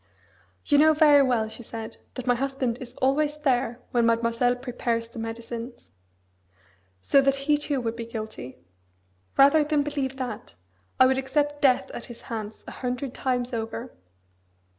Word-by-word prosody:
'You 290 -1 +4
know 315 +1 +6
very 295 -2 +7
well,' 245 -5 +2
she 220 - -8
said, 225 -1 -8 0.2
'that 255 - -5
my 245 - +4
husband 260 -1 -2
is 255 -1 -9
always 295 +3 +1
there 250 -5 0
when 240 -3 +3
Mademoiselle 230 +2 +2
prepares 240 -2 -2
the 230 - -10
medicines. 230 +1 -7 1.1
So 275 - +5
that 275 0 +3
he 300 0 +4
too 290 -2 -1
would 230 -1 -2
be 230 -1 -6
guilty. 215 - -7 0.8
Rather 280 +3 +6
than 295 -1 +1
believe 280 -2 -3
that, 250 - -6 0.4
I 260 - +8
would 260 +1 +3
accept 290 +2 -1
death 265 -4 +3
at 240 - -7
his 240 - -11
hands 215 -2 -6
a - - -8
hundred 250 +1 -4
times 250 -1 -1
over!' 225 +2 -4
250 Hz, 160 wpm, -26 LUFS, 230-275 Hz, 1.1 s, I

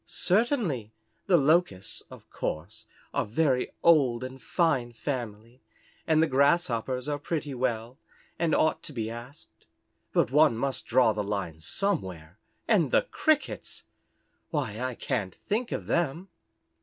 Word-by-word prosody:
"Certainly. 185 - 0 0.4
The 185 -3 +6
Locusts, 150 - +2
of - - -13
course 105 +8 -5 0.3
a - - +1
very 125 +3 +1
old 135 -8 +4
and 130 0 -7
fine 135 -9 +1
family, 120 -2 -5 0.5
and 160 -1 +4
the - - +3
Grasshoppers 135 -3 +2
are 145 -1 -1
pretty 150 -1 -3
well, 120 -1 -2 0.4
and 165 -2 +2
ought 155 - +2
to 150 - -9
be 110 -3 -3
asked. 120 +6 -11 0.4
But - - +2
one 150 -4 +5
must 135 +2 -2
draw 120 -2 +4
the 105 - -2
line 100 -6 -3
somewhere 90 - -2 0.3
and 180 - +3
the - - +4
Crickets! 310 -1 0 0.7
Why, 125 -9 -2
I 130 -1 -2
can't 110 -9 -2
think 230 +4 -2
of - - -3
them." 170 +2 -1
130 Hz, 135 wpm, -28 LUFS, 115-160 Hz, 0.7 s, The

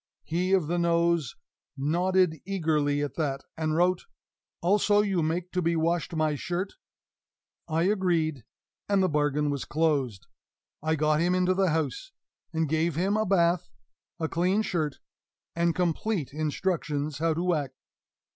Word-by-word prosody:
He 180 +3 -1
of 185 -5 +3
the 175 +3 -1
nose 170 -4 +1 0.4
nodded 175 +3 +1
eagerly 155 -6 0
at 145 - -3
that, 140 -4 -1
and 155 -1 -1
wrote, 180 - +2 0.5
"Also 205 +3 +3
you 195 -4 0
make 170 +3 -2
to 180 - 0
be 170 0 +1
washed 165 +1 0
my 155 -1 +1
shirt?" 175 +6 -3 0.9
I 160 0 +1
agreed; 170 - +1 0.5
and 200 -2 +3
the - - +4
bargain 150 -1 +1
was 140 -2 -3
closed. 145 - 0 0.6
I 160 +1 +1
got 155 0 +2
him 175 +2 +2
into 185 0 +2
the 190 0 +2
house, 160 - -2 0.4
and 160 -1 0
gave 160 +3 0
him 190 +5 +1
a 215 -1 +1
bath, 175 -2 +2 0.5
a 160 - 0
clean 185 +6 +1
shirt, 155 -8 -2 0.6
and 170 0 +1
complete 180 -2 -1
instructions 155 -2 -2
how 165 0 +1
to 175 +2 +1
act. 145 -4 -2
165 Hz, 145 wpm, -27 LUFS, 155-180 Hz, 0.9 s, the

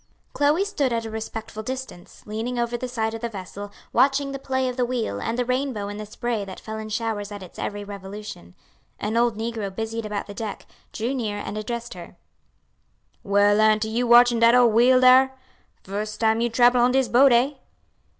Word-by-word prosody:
Chloe 300 +7 +2
stood 290 -11 -1
at 230 -1 -1
a 225 - -6
respectful 220 0 -6
distance, 255 -6 -8
leaning 225 +4 -4
over 240 0 -1
the 255 +1 -4
side 225 -3 -2
of 225 - -6
the 235 - -2
vessel, 200 0 -8 0.2
watching 275 +2 +3
the 275 - -5
play 260 -1 -1
of 250 - -3
the 250 - 0
wheel 235 - -2
and 230 - -2
the 250 - 0
rainbow 255 -5 -2
in 205 - -6
the 215 0 -7
spray 225 0 -3
that 190 -1 -9
fell 220 0 -7
in 215 0 -7
showers 215 -2 -3
at 205 -2 -7
its 180 - -12
every 205 0 -4
revolution. 200 - -9 0.4
An 215 +2 -2
old 235 -2 +2
negro 225 -2 -3
busied 225 +2 -4
about 205 -1 -3
the 205 - -9
deck; 210 0 -6 0.3
drew 235 +4 -2
near 220 -6 -2
and 205 0 -5
addressed 235 +2 -5
her: 175 -1 -11 1.1
"Well, 205 +1 +3
auntie, 215 0 +3
you 240 +2 0
watchin' 240 0 +6
dat 230 +1 +6
ole 245 -2 +5
wheel 245 +3 +5
dar? 260 +1 +6 0.5
Fust 210 +2 -5
time 225 0 +2
you 240 - +1
trable 245 +1 +4
on 245 +1 +3
dis 265 -1 +2
boat, 265 +3 +5
eh?" 245 +4 +4
225 Hz, 200 wpm, -24 LUFS, 210-245 Hz, 1.1 s, watchin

